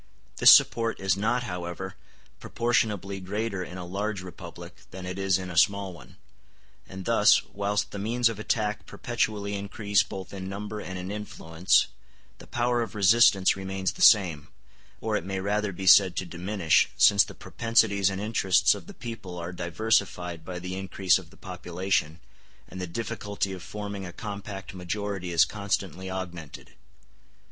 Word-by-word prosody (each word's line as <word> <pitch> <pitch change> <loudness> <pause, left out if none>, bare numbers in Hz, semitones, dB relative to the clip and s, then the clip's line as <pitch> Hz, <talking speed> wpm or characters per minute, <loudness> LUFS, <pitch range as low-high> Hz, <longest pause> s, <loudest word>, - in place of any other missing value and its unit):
This - - +7
support 115 -1 +5
is 95 -1 +1
not, 115 +5 0
however, 90 -2 -5 0.5
proportionably 105 -5 -1
greater 100 +1 -3
in 90 +1 -9
a 90 - -6
large 100 +1 -3
republic 90 -3 -10
than 95 0 -9
it 90 +1 -5
is 95 -1 +2
in 95 -1 -6
a - - -8
small 100 -2 +2
one; 85 - -15 0.7
and 95 -1 -8
thus, 115 -3 +5
whilst 100 0 -2
the 100 - -6
means 115 +4 +1
of 115 -2 -3
attack 105 -1 -1
perpetually 105 -4 -2
increase 100 0 0
both 95 0 -7
in 95 -1 -6
number 105 +2 -5
and 95 -2 -6
in 90 +2 -5
influence, 90 -4 +1 0.5
the - - -13
power 120 0 0
of 110 -4 -5
resistance 100 -1 +5
remains 95 -1 -2
the - - -10
same, 90 -9 +5 0.5
or - - -1
it - - -1
may 95 +1 -3
rather 105 +1 -1
be 95 +1 -7
said 95 -1 +7
to 95 - -2
diminish, 90 0 +1
since 100 0 +6
the - - -10
propensities 110 -4 +2
and 95 0 -4
interests 105 -3 +3
of - - -9
the - - -11
people 105 -7 -7
are 85 +1 -5
diversified 90 -2 -1
by 90 +2 -6
the 90 +1 -5
increase 95 -1 +1
of 90 -4 -14
the - - -19
population, 90 -2 -2 0.5
and 95 - -8
the 90 - -3
difficulty 100 -1 -3
of 95 - -8
forming 100 +1 -6
a - - -8
compact 100 -1 -7
majority 95 0 -4
is 85 0 +5
constantly 95 -1 -3
augmented. 90 -5 -7
95 Hz, 165 wpm, -27 LUFS, 90-105 Hz, 0.7 s, This